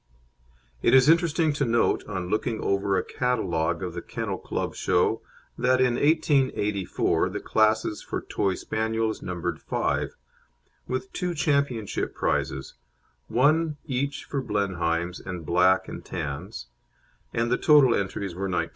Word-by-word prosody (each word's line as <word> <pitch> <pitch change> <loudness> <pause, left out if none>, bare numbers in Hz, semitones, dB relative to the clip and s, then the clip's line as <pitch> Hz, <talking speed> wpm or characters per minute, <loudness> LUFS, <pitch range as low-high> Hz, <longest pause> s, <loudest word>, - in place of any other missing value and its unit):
It - - +4
is 130 0 +6
interesting 165 -1 +3
to 145 - 0
note, 115 -2 +2
on 90 -4 -4
looking 110 +3 -1
over 100 0 +1
a - - 0
catalogue 85 -9 -1
of 90 -2 -4
the 85 - -5
Kennel - - -4
Club - - -3
Show, - - +1 0.4
that 130 +1 +3
in 125 -1 +3
1884 135 - +1
the - - -4
classes 110 -1 +1
for - - -4
Toy 95 -2 -1
Spaniels 110 +1 -2
numbered 85 -2 -4
five, - - -1 0.7
with 130 +10 -4
two 180 -2 -2
championship 140 -8 0
prizes, 65 -1 -1 0.5
one 150 +4 +2
each 140 +2 -2
for 140 - -2
Blenheims 90 -6 -1
and 90 -4 -6
Black 90 +4 +3
and - - -7
Tans, 70 - -5 0.7
and 120 0 0
the 125 - +3
total 145 -5 +6
entries 100 -2 -2
were 95 +3 -3
19. 85 -2 -1
110 Hz, 140 wpm, -26 LUFS, 90-130 Hz, 0.7 s, is